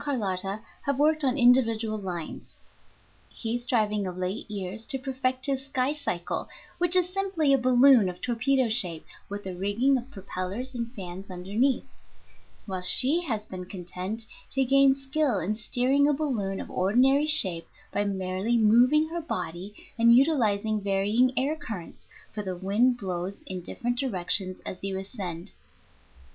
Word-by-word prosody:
Carlotta 200 -7 -2 0.2
have 280 -1 -1
worked 305 +1 +2
on 260 0 +1
individual 230 -3 +3
lines, 175 -5 -7 0.7
he 230 0 -3
striving 215 -5 0
of 180 0 -6
late 185 +4 -4
years 205 +2 -5
to 270 - 0
perfect 260 -1 -2
his 270 -1 -1
skycycle 260 -9 -2 0.3
(which 355 0 +2
is 365 -1 +4
simply 380 -7 +1
a - - +5
balloon 250 -4 +5
of 180 - -8
torpedo 250 +2 +1
shape 180 -8 0 0.2
with 205 0 -6
a 190 - -5
rigging 205 +9 +1
of 245 +2 -11
propellers 195 +3 -5
and 235 -1 -4
fans 190 -2 -8
underneath), 200 +9 0 0.8
while 190 -3 -4
she 265 - +5
has 220 -7 -3
been 185 -3 -7
content 185 +4 -6 0.2
to 270 0 +1
gain 275 +1 +5
skill 270 -3 -1
in 190 +3 -1
steering 255 +6 +2
a 295 - +3
balloon 235 -10 -2
of - - -8
ordinary 260 +10 +3
shape 190 - +4 0.2
by 205 - 0
merely 190 +3 -1
moving 245 +8 +4
her 340 +1 -4
body 185 - -5 0.3
and 235 0 +6
utilizing 220 -7 +2
varying 205 +6 +2
air 280 +4 +1
currents, 220 - -9 0.2
for 210 - -4
the 185 -3 -5
wind 215 +7 +2
blows 185 -2 -4
in 185 -1 -5
different 245 +6 -3
directions 185 -5 +1
as 185 - -7
you 195 -1 -2
ascend. 190 -3 -6
225 Hz, 150 wpm, -27 LUFS, 190-265 Hz, 0.8 s, and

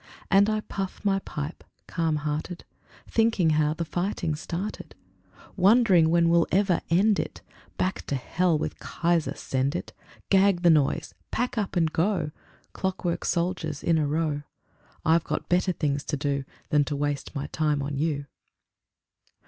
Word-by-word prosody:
And 200 +1 +5
I 215 0 0
puff 195 -2 -5
my 195 -1 +3
pipe, 150 -3 -6 0.2
calm 165 -3 0
hearted, 150 +3 -3 0.4
Thinking 225 -8 +2
how 155 0 +2
the 170 - -3
fighting 175 -1 -2
started, 170 +6 -5 0.6
Wondering 190 -4 +5
when 170 0 +4
we'll 170 0 +4
ever 190 -2 +2
end 195 +5 +4
it, - - -5 0.3
Back 185 +1 -2
to 140 - -1
Hell 170 +5 +1
with - - -4
Kaiser 170 -2 0
send 135 +3 -1
it, 175 - -5 0.4
Gag 195 -2 +4
the 170 - +7
noise, 150 -4 +1 0.2
pack 250 0 -1
up 205 -3 -2
and 165 -3 +2
go, 165 -3 0 0.4
Clockwork 185 -2 -2
soldiers 170 -4 -1
in 165 -1 +3
a 150 - +1
row. 150 -1 0 0.6
I've 160 +1 +4
got 155 - -3
better 180 +1 +2
things 145 -4 -1
to 145 - -2
do 140 -1 -1 0.2
Than 150 -1 +4
to 145 - -3
waste 145 -1 -2
my 140 0 -2
time 150 -3 0
on 140 +1 -3
you. 145 -1 -1
165 Hz, 155 wpm, -26 LUFS, 150-185 Hz, 0.6 s, the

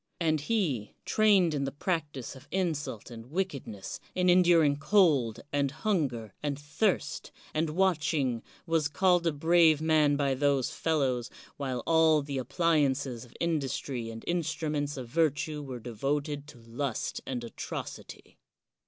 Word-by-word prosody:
And 155 -3 +1
he, 150 - -1
trained 200 -6 +4
in 140 -2 -1
the 135 - -3
practise 145 -5 -3
of 130 - -14
in 185 -3 +1
sult 130 -6 -6
and 115 0 -9
wickedness, 140 - -4 0.2
in 180 0 +4
enduring 170 -5 +5
cold, 150 - +3
and 140 -1 +2
hun 165 0 0
ger, 115 -4 -8
and 145 -2 -2
thirst, 145 +1 -1 0.2
and 155 +1 0
watching, 150 -8 +1 0.2
was 165 -3 +1
called 175 +4 +2
a - - +3
brave 160 +1 +4
man 155 -2 +3
by 140 -1 +1
those 140 -1 +1
fellows, 130 -7 0 0.3
while 130 -4 -3
all 160 -2 +4
the 140 -1 -3
appliances 140 -5 +1
of 120 - -20
industry 135 -6 -2
and 115 0 -8
instruments 155 -4 -1
of 125 -2 -6
virtue 150 +2 0
were 130 -3 -6
devoted 140 +5 -2
to 150 - -13
lust 115 +2 -3
and 125 -2 -3
atrocity. 115 - -8
145 Hz, 145 wpm, -29 LUFS, 130-165 Hz, 0.3 s, enduring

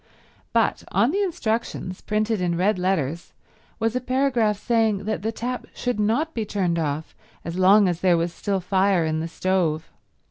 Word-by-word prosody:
But - - +1
on 240 - +3
the 400 +4 0
instructions, 225 - -2
printed 215 -1 0
in 175 -1 0
red 185 +2 +2
letters, 170 -4 -1 0.4
was 225 +1 -1
a 255 - 0
paragraph 250 -5 +1
saying 225 -3 +1
that 215 -2 -2
the 220 +2 -1
tap 245 +2 -4
should 245 -4 -2
not 235 +10 +1
be 225 - -2
turned 185 -5 -1
off 155 0 -3 0.3
as 170 +1 -4
long 195 +2 +6
as 175 -2 -1
there 180 -2 +4
was 170 +1 -1
still 195 +1 -2
fire 190 -1 +2
in 155 0 -1
the 165 - -3
stove. 165 -2 -1
200 Hz, 175 wpm, -24 LUFS, 175-225 Hz, 0.4 s, long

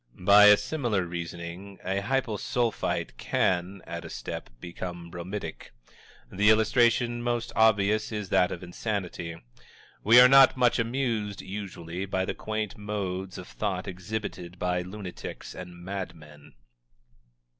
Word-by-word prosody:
By 100 +3 +7
a 105 0 +9
similar 120 - -1
reasoning, 85 +3 -7
a 95 +1 -1
Hypo 120 0 -1
Sulphite 120 +1 -1
can, 90 +1 0
at 85 0 -6
a - - -8
step, - - -6
become 85 0 -7
bromidic. 90 +4 -6 0.6
The 105 +3 +3
illustration 120 +2 +3
most 120 -1 -1
obvious 110 -1 +3
is 105 -3 -4
that 90 -2 +3
of 90 - -6
insanity. 90 -3 -4 0.6
We 115 +4 +8
are 125 - +10
not 135 0 +7
much 125 -2 +3
amused, 115 -4 -1
usually, 95 -2 -6
by 95 -1 0
the - - -2
quaint 110 -2 -4
modes 95 -3 -4
of - - -8
thought - - -3
exhibited 90 -1 -5
by 90 0 0
lunatics 95 0 -8
and 90 -1 -9
madmen. 85 -7 -8
100 Hz, 130 wpm, -27 LUFS, 90-110 Hz, 0.6 s, are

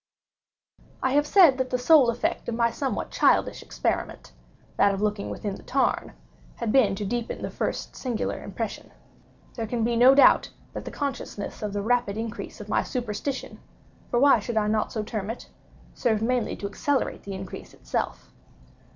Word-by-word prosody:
I 260 - +2
have 290 +2 +3
said 325 -9 +6
that 260 0 0
the 250 - 0
sole 265 0 +6
effect 235 +1 -1
of 235 - -2
my 235 0 +2
somewhat 270 +2 -3
childish - - +2
experiment—that 200 - -2
of - - -5
looking 210 -1 -1
down - - -5
within 205 -2 -4
the - - -13
tarn—had 245 -3 -3
been 215 -7 +4
to 205 - -4
deepen 235 +3 -3
the - - -3
first - - -3
singular 245 -4 -3
impression. - - -5 0.6
There 225 -2 -4
can 230 0 -1
be 235 +1 +1
no 250 +3 +7
doubt 275 -2 +6 0.2
that - - -6
the - - -4
consciousness 275 -7 -5
of 210 -1 -2
the 205 -1 -2
rapid 235 -3 +1
increase 230 +1 -5
of - - -8
my - - +2
superstition—for 245 0 -5
why 280 +2 +6
should 235 -3 -4
I 215 - +3
not 215 0 0
so 215 - -2
term 210 -2 -4
it?—served 225 -1 -4
mainly 245 0 0
to - - -7
accelerate 270 +8 -1
the 200 - -7
increase 190 -1 -8
itself. - - -4
235 Hz, 170 wpm, -26 LUFS, 210-260 Hz, 0.6 s, no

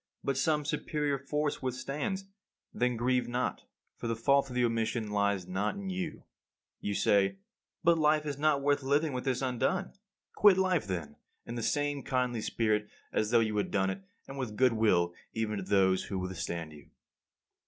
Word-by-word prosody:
But 140 - 0
some 150 +2 +1
superior 145 -1 -1
force 150 +2 -2
withstands. 140 +9 -3 0.5
Then 125 -1 +1
grieve 125 +1 +1
not, 125 +1 -2 0.3
for - - -5
the 115 - 0
fault 140 +4 +3
of 125 - -7
the 125 -1 +3
omission 115 -1 -1
lies 100 -2 +1
not 95 - -1
in 195 -1 -4
you. 180 -4 -4 1.6
But 170 -1 +4
life 150 0 +3
is 145 -2 -4
not 150 -2 +2
worth 145 0 +2
living 145 +2 +1
with 125 +1 -3
this 130 0 0
undone. 130 +9 0 0.4
Quit 205 -3 +6
life 185 - +2
then, 85 -6 -4 0.3
in 115 - -6
the 120 - -3
same 145 +3 0
kindly 125 -4 -1
spirit 105 -1 0 0.2
as 110 - +1
though 115 0 +5
you 110 -1 0
had 105 - 0
done 95 -1 +1
it, - - -6 0.3
and 135 0 -7
with 110 -5 -4
goodwill 110 -9 +3 0.2
even 110 -2 -1
to 100 - -3
those 95 -1 +3
who 95 - -4
withstand 85 -3 -4
you. 75 -2 -15
125 Hz, 170 wpm, -31 LUFS, 105-145 Hz, 1.6 s, Quit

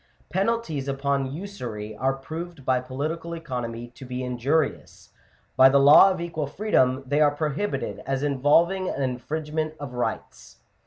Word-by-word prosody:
Penalties 190 -7 -1
upon 140 -1 -1
usury 125 - -6
are 130 +5 0
proved 160 +2 -8
by 130 -1 +2
political 155 +7 -4
economy 120 -7 -5
to 120 +2 -13
be 125 0 -5
injurious: 130 +5 -1 0.5
by 130 0 +8
the 140 - +4
law 145 +7 +8
of 185 -2 -2
equal 160 -4 -3
freedom 135 -7 +1
they 145 +3 +1
are 150 - +6
prohibited 150 +1 -2
as 135 0 -1
involving 155 +7 +2
an 140 - -2
infringement 155 +4 -3
of 145 -4 -7
rights. 125 0 -5
140 Hz, 145 wpm, -25 LUFS, 130-160 Hz, 0.5 s, by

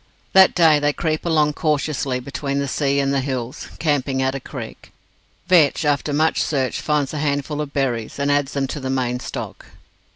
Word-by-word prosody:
That 190 -1 +7
day 160 -4 +5
they 145 0 +1
creep 155 +2 -2
along 150 -2 +2
cautiously 145 -4 -1
between 140 +2 -4
the 140 0 -1
sea 140 +1 0
and 140 0 +1
the 140 - +2
hills, 130 -2 -4
camping 140 -4 0
at 130 0 +1
a 135 - -4
creek. - - -9 0.6
Vetch, 165 -4 +4
after 145 0 +1
much 155 +3 +2
search, 135 -4 -1
finds 150 -2 0
a 150 - -3
handful 145 0 -1
of 145 -2 -5
berries, 125 -6 -2
and 140 0 0
adds 145 -1 +1
them 140 -1 0
to 135 - -5
the 130 -1 -4
main 125 -2 -1
stock. - - -7
140 Hz, 190 wpm, -21 LUFS, 135-150 Hz, 0.6 s, That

